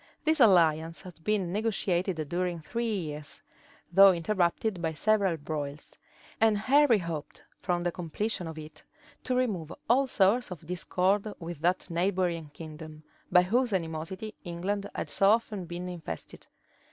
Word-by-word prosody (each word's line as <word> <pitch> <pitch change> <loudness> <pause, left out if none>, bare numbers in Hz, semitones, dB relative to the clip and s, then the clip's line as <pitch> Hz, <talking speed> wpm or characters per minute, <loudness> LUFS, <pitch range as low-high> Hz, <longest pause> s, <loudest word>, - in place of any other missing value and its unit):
This 315 0 +2
alliance 165 - +4
had 175 -3 -12
been 200 -4 0
negotiated 190 -6 0
during 175 +1 -2
three 230 +9 -3
years, 155 -7 -5 0.5
though 195 +1 +9
interrupted 180 +2 0
by 160 -1 -1
several 200 0 +2
broils; 145 -1 -5 0.4
and 220 -1 +4
Henry 265 +2 +4
hoped, 165 -5 -6 0.2
from 175 -2 -1
the 175 - 0
completion 180 +2 -3
of 160 -1 -7
it, 155 0 -10 0.4
to 255 - 0
remove 200 -11 -1 0.2
all 270 +3 +4
source 215 +2 +2
of 170 -3 -8
discord 185 +4 0
with 170 -3 -7
that 180 +2 +1
neighboring 175 -2 0
kingdom, 155 0 -10 0.3
by 180 0 +7
whose 235 +4 +1
animosity 175 +4 -3
England 195 +3 -3
had - - -4
so 195 - +4
often 215 -4 +1
been 175 +1 -6
infested. 165 - -7
180 Hz, 140 wpm, -29 LUFS, 165-210 Hz, 0.5 s, though